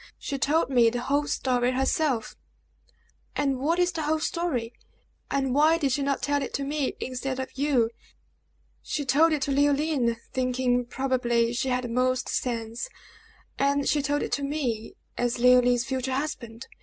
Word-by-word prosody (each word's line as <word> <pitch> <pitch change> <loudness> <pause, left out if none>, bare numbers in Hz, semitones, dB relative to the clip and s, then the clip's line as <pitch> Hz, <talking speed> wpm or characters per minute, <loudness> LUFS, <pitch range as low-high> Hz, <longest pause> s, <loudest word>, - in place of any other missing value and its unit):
She 275 - -4
told 290 -1 +1
me 240 -3 +5
the 245 +1 -3
whole 285 +3 0
story 250 -1 +1
herself!" 265 -2 0 1.0
"And 275 -3 0
what 320 +6 +1
is 355 0 +2
the 330 -2 -4
whole 310 +1 +1
story; 310 -9 -2 0.6
and 270 -2 0
why 310 +4 +4
did 285 -5 0
she 280 - 0
not 275 0 -1
tell 285 0 +1
it - - -4
to 280 - -2
me 285 -1 -2
instead 260 +1 -3
of 260 - -5
you." 265 -5 +2 0.9
"She 290 - -3
told 300 +6 +4
it 300 -3 0
to 280 - -1
Leoline, 285 -3 +2 0.2
thinking, 255 -1 +1
probably, 240 -2 0
she 260 +2 -1
had 250 0 0
the - - -3
most 255 +2 0
sense; 230 - -3 0.7
and 280 0 +2
she 295 - +2
told 290 +1 0
it - - -4
to 285 - -1
me, 260 -7 -3 0.2
as 245 0 0
Leoline's 245 0 +4
future 265 0 -2
husband. 240 -5 -4
265 Hz, 170 wpm, -26 LUFS, 245-290 Hz, 1.0 s, me